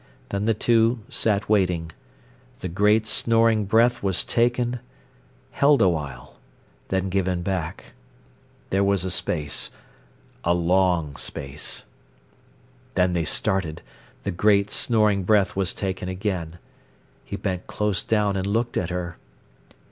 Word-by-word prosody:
Then 100 Hz, +1 st, -2 dB
the 110 Hz, -1 st, +2 dB
two 115 Hz, +1 st, +2 dB
sat 105 Hz, -2 st, +1 dB
waiting. 90 Hz, -6 st, +1 dB, 0.7 s
The 90 Hz, -, -3 dB
great, 105 Hz, +5 st, +3 dB
snoring 115 Hz, -1 st, +3 dB
breath 115 Hz, +4 st, +3 dB
was 95 Hz, -3 st, +1 dB
taken—held 125 Hz, +4 st, -1 dB
awhile—then 85 Hz, +4 st, -3 dB
given 90 Hz, -2 st, 0 dB
back. 90 Hz, -4 st, -4 dB, 0.8 s
There 95 Hz, +1 st, +2 dB
was 100 Hz, -2 st, +1 dB
a 95 Hz, -, -2 dB
space—a 75 Hz, -1 st, -3 dB
long 85 Hz, -3 st, +2 dB
space. 70 Hz, 0 st, -4 dB, 1.1 s
Then 90 Hz, -1 st, +2 dB
they 85 Hz, -2 st, 0 dB
started. 95 Hz, -2 st, -1 dB, 0.4 s
The -, -, -2 dB
great, 100 Hz, +2 st, +3 dB
snoring 105 Hz, -4 st, +3 dB
breath 100 Hz, 0 st, +2 dB
was 95 Hz, -1 st, 0 dB
taken 95 Hz, -2 st, -4 dB
again. 90 Hz, -4 st, -3 dB, 0.7 s
He -, -, -6 dB
bent 90 Hz, -2 st, -3 dB
close 105 Hz, -2 st, -1 dB
down 105 Hz, -3 st, +1 dB
and 95 Hz, 0 st, -1 dB
looked 115 Hz, +4 st, 0 dB
at 90 Hz, -, -1 dB
her. 90 Hz, -2 st, -4 dB
95 Hz, 115 wpm, -24 LUFS, 90-105 Hz, 1.1 s, great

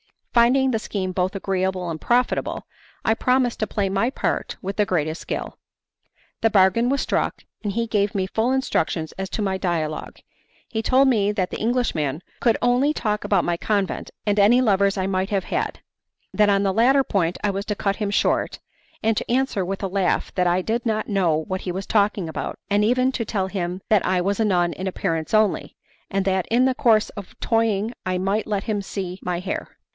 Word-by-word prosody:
Finding 255 Hz, +3 st, +4 dB
the 225 Hz, -, 0 dB
scheme 190 Hz, -3 st, -3 dB
both 185 Hz, +1 st, -1 dB
agreeable 190 Hz, -2 st, -1 dB
and 160 Hz, -, -5 dB
profitable, 245 Hz, +1 st, 0 dB, 0.4 s
I 220 Hz, -, +4 dB
promised 250 Hz, +1 st, +1 dB
to 215 Hz, -, 0 dB
play 200 Hz, -1 st, -1 dB
my 195 Hz, +5 st, +1 dB
part 270 Hz, -, -2 dB
with 195 Hz, +1 st, -5 dB
the 210 Hz, -, +3 dB
greatest 160 Hz, -4 st, -1 dB
skill. -, -, -5 dB, 0.8 s
The 225 Hz, -, +3 dB
bargain 205 Hz, +4 st, +4 dB
was 280 Hz, +1 st, +1 dB
struck, -, -, -1 dB, 0.2 s
and 205 Hz, -2 st, -2 dB
he 230 Hz, +2 st, 0 dB
gave 210 Hz, -3 st, 0 dB
me 190 Hz, -1 st, +1 dB
full 220 Hz, +6 st, 0 dB
instructions 165 Hz, -11 st, 0 dB
as 190 Hz, 0 st, -3 dB
to 215 Hz, -, -2 dB
my 190 Hz, -1 st, 0 dB
dialogue. 165 Hz, -5 st, -2 dB, 0.5 s
He 220 Hz, -, -2 dB
told 265 Hz, +4 st, +4 dB
me 210 Hz, -5 st, +2 dB
that 185 Hz, -3 st, -1 dB
the -, -, -4 dB
Englishman 180 Hz, -, 0 dB, 0.2 s
could 230 Hz, -3 st, +3 dB
only 250 Hz, +5 st, +3 dB
talk 210 Hz, -6 st, -1 dB
about 200 Hz, -, +2 dB
my 170 Hz, -1 st, 0 dB
convent 200 Hz, 0 st, -1 dB, 0.2 s
and 205 Hz, -1 st, +2 dB
any 215 Hz, +5 st, +6 dB
lovers 200 Hz, -4 st, +2 dB
I 190 Hz, -, 0 dB
might 190 Hz, 0 st, -1 dB
have 195 Hz, -3 st, 0 dB
had; -, -, -3 dB, 0.5 s
that 210 Hz, -1 st, +4 dB
on 200 Hz, 0 st, +3 dB
the 195 Hz, -1 st, +1 dB
latter 265 Hz, +6 st, +4 dB
point 180 Hz, -7 st, 0 dB
I 205 Hz, -, +2 dB
was 200 Hz, +1 st, -4 dB
to 210 Hz, -, -2 dB
cut 195 Hz, 0 st, -1 dB
him 210 Hz, -2 st, -1 dB
short, 205 Hz, -, +1 dB, 0.5 s
and 220 Hz, 0 st, +2 dB
to -, -, -3 dB
answer 250 Hz, -5 st, +1 dB
with 195 Hz, +2 st, -4 dB
a -, -, +1 dB
laugh 190 Hz, -1 st, 0 dB
that 180 Hz, -1 st, +1 dB
I 180 Hz, +1 st, +2 dB
did 230 Hz, +4 st, -1 dB
not 220 Hz, -2 st, -1 dB
know 185 Hz, -6 st, +2 dB
what 185 Hz, +4 st, -3 dB
he 180 Hz, -, -3 dB
was 190 Hz, +2 st, -4 dB
talking 205 Hz, -4 st, +1 dB
about, -, -, -4 dB
and 205 Hz, +1 st, +3 dB
even 255 Hz, +4 st, +3 dB
to 235 Hz, -3 st, -3 dB
tell 195 Hz, -3 st, -1 dB
him 185 Hz, -1 st, -3 dB
that 215 Hz, -3 st, +4 dB
I 185 Hz, -1 st, +1 dB
was 200 Hz, +3 st, -1 dB
a 220 Hz, -, +3 dB
nun 175 Hz, -4 st, +2 dB
in 190 Hz, -, -5 dB
appearance 165 Hz, -3 st, -2 dB
only, 215 Hz, -1 st, +2 dB, 0.3 s
and 195 Hz, -1 st, -1 dB
that 190 Hz, -2 st, +1 dB
in 245 Hz, +3 st, +3 dB
the 260 Hz, -, +3 dB
course 225 Hz, -4 st, +3 dB
of 200 Hz, -3 st, -10 dB
toying 225 Hz, -1 st, +1 dB
I 185 Hz, 0 st, 0 dB
might 195 Hz, +4 st, -1 dB
let 205 Hz, -2 st, -1 dB
him 215 Hz, -3 st, -1 dB
see 190 Hz, -2 st, -5 dB
my 175 Hz, -1 st, -2 dB
hair. 185 Hz, +2 st, -5 dB
200 Hz, 210 wpm, -23 LUFS, 185-225 Hz, 0.8 s, any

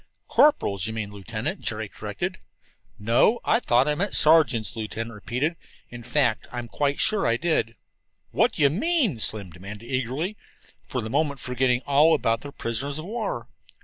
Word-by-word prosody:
"Corporals, 105 Hz, -, +3 dB
you 110 Hz, -, -4 dB
mean, 110 Hz, -2 st, -4 dB
Lieutenant," 100 Hz, -3 st, -4 dB
Jerry -, -, -3 dB
corrected. -, -, -5 dB, 0.6 s
"No, 115 Hz, -, +3 dB
I 225 Hz, -, +3 dB
thought 125 Hz, -, +3 dB
I 150 Hz, -, +2 dB
meant 195 Hz, +6 st, -2 dB
sergeants," 145 Hz, -, +4 dB
the 115 Hz, -, -8 dB
lieutenant 115 Hz, +1 st, -4 dB
repeated. 125 Hz, +10 st, -2 dB, 0.3 s
"In 120 Hz, 0 st, -8 dB
fact, 120 Hz, -1 st, 0 dB
I'm 120 Hz, -1 st, -5 dB
quite 145 Hz, +3 st, -1 dB
sure 215 Hz, -2 st, +2 dB
I 115 Hz, -, +2 dB
did." 155 Hz, -7 st, 0 dB, 0.6 s
"What -, -, +2 dB
do -, -, 0 dB
you 140 Hz, -, +5 dB
mean?" 240 Hz, -, +1 dB
Slim 105 Hz, -4 st, -1 dB
demanded 100 Hz, +6 st, -10 dB
eagerly, 135 Hz, -, -2 dB, 0.5 s
for 125 Hz, -, -2 dB
the 110 Hz, -, -5 dB
moment 140 Hz, 0 st, 0 dB
forgetting 125 Hz, 0 st, 0 dB
all 150 Hz, +3 st, +5 dB
about 115 Hz, -6 st, 0 dB
their 145 Hz, -, -8 dB
prisoners 140 Hz, +4 st, -3 dB
of 155 Hz, -, -6 dB
war. 210 Hz, -, -4 dB
125 Hz, 170 wpm, -25 LUFS, 115-155 Hz, 0.6 s, you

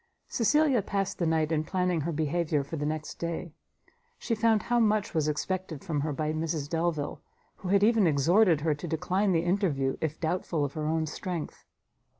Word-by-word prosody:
Cecilia 275 Hz, +1 st, +3 dB
passed 195 Hz, 0 st, -2 dB
the 170 Hz, -, +1 dB
night 160 Hz, -1 st, +1 dB
in 155 Hz, -1 st, +1 dB
planning 180 Hz, 0 st, 0 dB
her 170 Hz, +4 st, -2 dB
behaviour 155 Hz, -1 st, 0 dB
for 140 Hz, +4 st, -6 dB
the 150 Hz, -1 st, -2 dB
next 155 Hz, 0 st, -4 dB
day; 170 Hz, -1 st, -4 dB, 0.6 s
she 235 Hz, -, -2 dB
found 220 Hz, -1 st, +2 dB
how 240 Hz, 0 st, +1 dB
much 215 Hz, -2 st, +2 dB
was 155 Hz, -3 st, +1 dB
expected 160 Hz, 0 st, -3 dB
from 150 Hz, -3 st, -1 dB
her 155 Hz, +1 st, -1 dB
by 155 Hz, +2 st, -2 dB
Mrs 155 Hz, -2 st, -2 dB
Delvile, 160 Hz, -2 st, -2 dB, 0.4 s
who 185 Hz, -, -6 dB
had 200 Hz, +1 st, +4 dB
even 220 Hz, -3 st, +4 dB
exhorted 165 Hz, +3 st, +4 dB
her 155 Hz, 0 st, +2 dB
to 150 Hz, +4 st, -6 dB
decline 185 Hz, +5 st, 0 dB
the 165 Hz, -1 st, +1 dB
interview 175 Hz, -8 st, +1 dB
if 155 Hz, -1 st, -2 dB
doubtful 160 Hz, -2 st, -1 dB
of 140 Hz, -, -5 dB
her 155 Hz, -1 st, -3 dB
own 160 Hz, 0 st, +1 dB
strength. 170 Hz, +1 st, -5 dB
165 Hz, 185 wpm, -28 LUFS, 155-190 Hz, 0.6 s, had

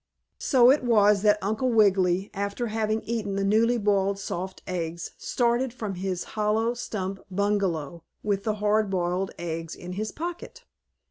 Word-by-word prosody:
So 255 Hz, -2 st, +5 dB
it 285 Hz, -, +2 dB
was 210 Hz, -4 st, +4 dB
that 210 Hz, 0 st, +4 dB
Uncle 220 Hz, +6 st, 0 dB
Wiggily, 195 Hz, -3 st, +3 dB
after 200 Hz, +4 st, -2 dB
having 220 Hz, 0 st, 0 dB
eaten 215 Hz, -4 st, -2 dB
the 195 Hz, -, 0 dB
newly 225 Hz, +4 st, +3 dB
boiled 200 Hz, -2 st, +1 dB
soft 185 Hz, -1 st, -5 dB
eggs, 170 Hz, -2 st, -4 dB
started 240 Hz, +1 st, +1 dB
from 215 Hz, -4 st, -5 dB
his 185 Hz, -1 st, -3 dB
hollow 220 Hz, +2 st, +1 dB
stump 195 Hz, -5 st, -4 dB
bungalow 185 Hz, -6 st, -1 dB, 0.2 s
with 200 Hz, -2 st, 0 dB
the 215 Hz, -1 st, 0 dB
hard 210 Hz, 0 st, +1 dB
boiled 180 Hz, 0 st, -1 dB
eggs 165 Hz, -1 st, -4 dB
in 180 Hz, -, -8 dB
his 215 Hz, +3 st, -3 dB
pocket. 350 Hz, +9 st, -6 dB
205 Hz, 150 wpm, -26 LUFS, 190-220 Hz, 0.2 s, So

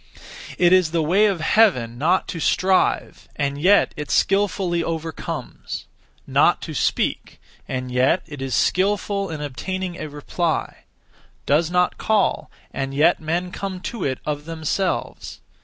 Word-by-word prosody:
It 175 Hz, 0 st, +5 dB
is 185 Hz, -4 st, +4 dB
the 165 Hz, 0 st, 0 dB
way 195 Hz, +7 st, +4 dB
of 190 Hz, -5 st, -1 dB
Heaven 125 Hz, -, +3 dB
not 175 Hz, +6 st, +2 dB
to 165 Hz, -, -4 dB
strive, 185 Hz, +3 st, +1 dB
and 140 Hz, 0 st, -2 dB
yet 200 Hz, +4 st, +4 dB
it 150 Hz, -, -6 dB
skilfully 195 Hz, -3 st, +1 dB
overcomes; 160 Hz, -1 st, -5 dB, 0.4 s
not -, -, +3 dB
to -, -, -6 dB
speak, -, -, -1 dB, 0.3 s
and 130 Hz, -1 st, -4 dB
yet 130 Hz, +8 st, +2 dB
it 145 Hz, -3 st, -9 dB
is 135 Hz, -1 st, -2 dB
skilful 200 Hz, +1 st, +1 dB
in 155 Hz, -2 st, -5 dB
obtaining 180 Hz, +6 st, -4 dB
a 155 Hz, -, -6 dB
reply; 155 Hz, +3 st, -3 dB, 0.6 s
does 155 Hz, +3 st, +2 dB
not 180 Hz, 0 st, +1 dB
call, 215 Hz, -3 st, +1 dB, 0.2 s
and 135 Hz, 0 st, -4 dB
yet 155 Hz, +5 st, +4 dB
men 170 Hz, +3 st, -2 dB
come 195 Hz, -1 st, -5 dB
to 235 Hz, -, -5 dB
it 130 Hz, -2 st, -1 dB
of 150 Hz, -1 st, -3 dB
themselves. 165 Hz, +3 st, -3 dB
170 Hz, 140 wpm, -22 LUFS, 150-185 Hz, 0.6 s, It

